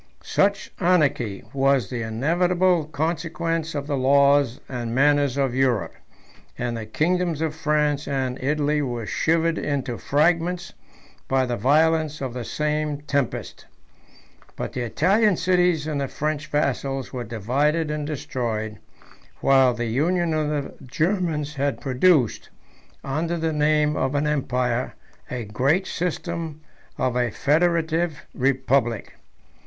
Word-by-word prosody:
Such 200 0 +1
anarchy 145 - +1
was 135 -5 +2
the 120 -2 -3
inevitable 170 +9 +1
consequence 165 +1 -2
of 140 -1 -2
the 145 -1 -1
laws 140 -1 +3
and 120 -2 -4
manners 145 -1 +3
of 135 -3 +1
Europe; 130 -5 +1 0.6
and 120 -1 -2
the 110 -1 -6
kingdoms 170 +5 0
of 160 -1 -1
France 150 -2 0
and 130 -2 -2
Italy 150 +1 +1
were 120 -5 -3
shivered 165 +6 +1
into 135 -5 -2
fragments 170 +4 +1 0.5
by 130 -1 +2
the 120 -1 -2
violence 155 +5 +2
of 130 -3 -4
the 125 -1 -4
same 150 +2 -2
tempest. 140 -4 -3 0.9
But - - -5
the 125 - -3
Italian 185 - +2
cities 180 -3 +2
and 150 -2 -2
the 135 - -1
French 155 +2 -3
vassals 135 -2 -1
were 125 -1 -3
divided 140 +9 0
and 150 -1 -3
destroyed, 115 -7 -3 0.6
while 135 -2 +4
the 120 0 -2
union 165 +8 +1
of 155 -1 0
the 145 -2 -3
Germans 155 +1 -1
has 140 0 0
produced, 135 - +2 0.5
under 160 +5 -2
the 160 -1 -1
name 150 0 +2
of 135 +2 -1
an 145 +1 +1
empire, 125 -4 -1 0.3
a 125 -2 -4
great 135 - +1
system 170 -3 -3 0.4
of 130 -1 0
a 125 -1 +1
federative 160 +2 +1
republic. 130 -3 0
145 Hz, 130 wpm, -23 LUFS, 130-160 Hz, 0.9 s, while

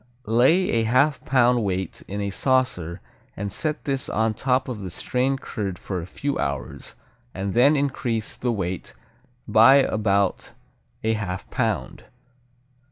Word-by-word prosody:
Lay 130 - +3
a 115 -1 +2
half 135 +6 +2
pound 125 -2 +3
weight 95 -2 -3
in 100 +1 -4
a 100 0 -2
saucer 100 - 0 0.4
and 100 0 -4
set 155 -2 -3
this 135 -2 -2
on 110 0 +1
top 130 +3 0
of 120 -5 -5
the 95 - -5
strained 130 +9 -1
curd 100 -6 -4
for 95 0 -4
a 85 - -8
few 140 +8 -3
hours, 70 -3 -4 0.4
and 95 0 -3
then 135 +6 +5
increase 125 -6 -1
the 125 - -1
weight 95 -5 -4 0.5
by 115 +5 +7
about 105 -7 +1 0.5
a 110 0 +2
half 100 -4 -4
pound. - - -2
110 Hz, 145 wpm, -24 LUFS, 100-130 Hz, 0.5 s, by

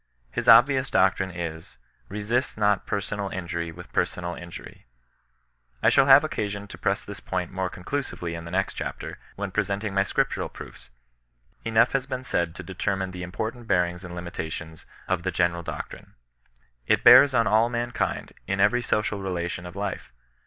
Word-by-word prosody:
His - - 0
obvious 135 +1 +7
doctrine 95 0 +3
is: 85 -2 -6 0.2
— - - -37
Besist 105 +6 -1
not 105 -2 +2
persorud 100 0 -3
injury 85 -2 -3
with 90 +2 -12
persomd 90 -1 -1
injwry, 85 -7 -10 1.0
I - - +7
shall 140 -1 +5
have 135 +2 +9
occasion 100 -8 -3
to - - -9
press 100 +1 0
this 100 - -7
point 90 -2 -3
more 95 -1 -2
condusively 90 -3 -4
in 85 0 -6
the 85 - -8
next 95 +2 0
chapter, - - -6 0.2
when 100 -1 -4
presenting 100 +1 -1
my 95 - +3
Scriptural 95 - 0
proofs. - - -11 0.7
Enough 115 0 +3
has 135 -2 -1
been 130 0 -4
said 85 -8 -1
to - - -7
deter 95 +1 -2
mine 95 -1 -3
the 90 -1 -7
important 110 +6 -5
bearings 90 -1 +1
and 90 -1 -8
limitations 80 -2 -6 0.2
of 90 -2 0
the 95 - -1
gene 90 -2 +2
ral 85 0 -6
doctrine. - - -7 0.7
It - - +3
bears 140 -2 +9
on 115 -1 +4
all 110 +3 +4
mankind, 120 0 -2
in 95 0 -1
every 110 +5 +4
social 105 -3 -1
relation 90 -2 -3
of 90 - -10
life. 100 -8 -4
95 Hz, 175 wpm, -26 LUFS, 90-110 Hz, 1.0 s, have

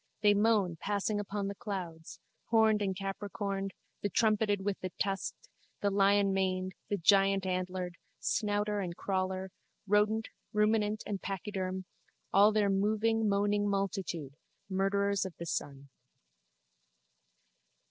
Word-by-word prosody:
They 205 -1 +6
moan, 205 -5 +2
passing 205 +3 -1
upon 200 0 -3
the 200 - -3
clouds, 180 -6 -6 0.3
horned 220 -2 +4
and 190 -2 0
capricorned, 195 0 -3 0.3
the 205 - 0
trumpeted 210 0 +2
with 205 -2 -1
the 185 - -4
tusked, 195 - -2 0.3
the 200 - +2
lionmaned, 195 -2 +2 0.2
the 205 - +1
giantantlered, 185 -1 +2 0.2
snouter 210 0 0
and 175 -3 -4
crawler, 190 -1 -2 0.3
rodent, 210 +2 +2 0.2
ruminant 210 0 +2
and 200 -2 -3
pachyderm, 190 -1 -3 0.5
all 205 +2 +7
their 210 -1 +2
moving 215 +3 +2
moaning 205 +1 +2
multitude, 190 -7 -2 0.3
murderers 200 +1 +1
of 190 -3 -6
the 170 - -6
sun. 140 -3 -4
200 Hz, 115 wpm, -32 LUFS, 190-210 Hz, 0.5 s, all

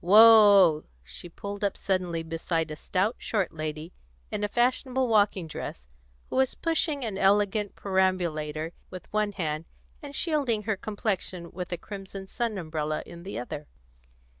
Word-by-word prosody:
Whoa!" 205 -5 +8 0.2
She 65 - -9
pulled 200 +4 -7
up 200 - 0
suddenly 180 -4 -1
beside 165 0 -2
a - - -4
stout, 190 +8 0
short 200 -5 -1
lady 155 +1 -5 0.4
in 210 - -2
a - - +2
fashionable 255 +3 +1
walking 205 -5 +3
dress, 65 - -7 0.4
who - - -1
was 265 -1 +2
pushing 310 -5 0
an 200 -3 -3
elegant 205 +1 +2
perambulator 170 -5 0 0.2
with 185 +1 -10
one 210 -1 +1
hand, 155 -4 -3 0.4
and 285 -1 -8
shielding 275 -10 +1
her 220 0 0
complexion 190 -4 -3
with 180 0 -6
a 175 - -1
crimson 195 +1 -8
sun 230 +1 -2
umbrella 155 -3 -2
in 170 - -11
the 190 +3 -6
other. 145 +5 -6
190 Hz, 150 wpm, -27 LUFS, 165-215 Hz, 0.4 s, Whoa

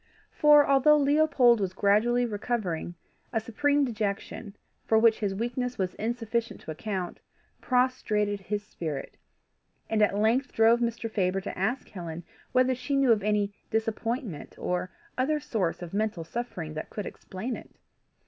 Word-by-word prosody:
For, 295 -1 +6
although 280 +2 +5
Leopold 285 -5 +4
was 190 -2 -1
gradually 225 +5 +3
recovering, 205 -6 -2 0.4
a 225 - +1
supreme 285 +6 +1
dejection, 210 -2 -4 0.3
for 220 - +3
which 225 0 +5
his 200 -2 -1
weakness 245 +3 -2
was 185 -2 -1
insufficient 230 +1 -2
to - - -7
account, 185 +2 -4 0.4
prostrated 215 -5 +1
his 205 +2 -3
spirit, 155 -8 -5 0.8
and 220 -1 +2
at 205 -1 +3
length 230 +6 +2
drove 225 +1 +5
Mr. 235 -1 -1
Faber 195 -3 0
to 195 - -6
ask 220 +8 -1
Helen 170 -3 -7 0.3
whether 255 0 +3
she 255 +3 -2
knew 275 -3 +4
of 215 -2 +4
any 205 0 +1 0.2
disappointment 225 - -2
or 180 +1 -2 0.3
other 300 +4 +2
source 185 - -2
of 175 - -8
mental 210 -4 -1
suffering 165 -4 -5
that 155 - -6
could 210 - -5
explain 220 +7 -5
it. - - -11
220 Hz, 150 wpm, -28 LUFS, 195-250 Hz, 0.8 s, For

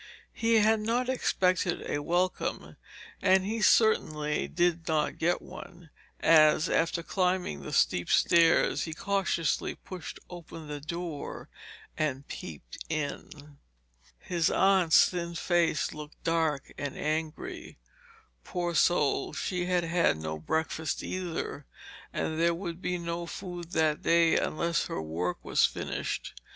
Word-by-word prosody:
He 230 0 +2
had 220 0 +4
not 235 +4 0
expected 185 -8 +1
a 145 - -1
welcome, 175 +4 -1 0.5
and 190 -1 +4
he 220 +2 -2
certainly 155 -10 +3
did 175 -1 0
not 155 -2 0
get 175 +2 +1
one, 175 -3 -11 0.3
as, 155 -1 +5
after 170 +1 +1
climbing 180 - -1
the 70 - -7
steep 90 - +2
stairs, 165 -1 +4
he 160 -2 -6
cautiously 190 -4 0
pushed 180 -4 -9
open 165 -2 -10
the 150 -1 -5
door 170 -1 -6 0.5
and 140 -3 -2
peeped 70 -7 -8
in. 150 -1 -5 0.6
His 170 - 0
aunt's 190 -4 +5
thin 170 -1 -4
face 170 -2 +1
looked 150 -1 -10
dark 160 -4 0
and 145 -2 -4
angry. 160 - -4 0.7
Poor 175 -2 -3
soul, 155 -2 +2
she 180 -1 -2
had 180 -1 +1
had 170 - +2
no 80 0 -5
breakfast 160 - -2
either, 170 -5 -4 0.4
and 160 0 -2
there 170 0 +3
would 170 -1 -6
be 180 -2 -1
no 170 0 -4
food 175 -1 -7
that 155 -1 +2
day 165 -1 +4
unless 170 +1 0
her - - -4
work 85 +3 -3
was - - +2
finished. - - -4
170 Hz, 130 wpm, -29 LUFS, 155-180 Hz, 0.7 s, as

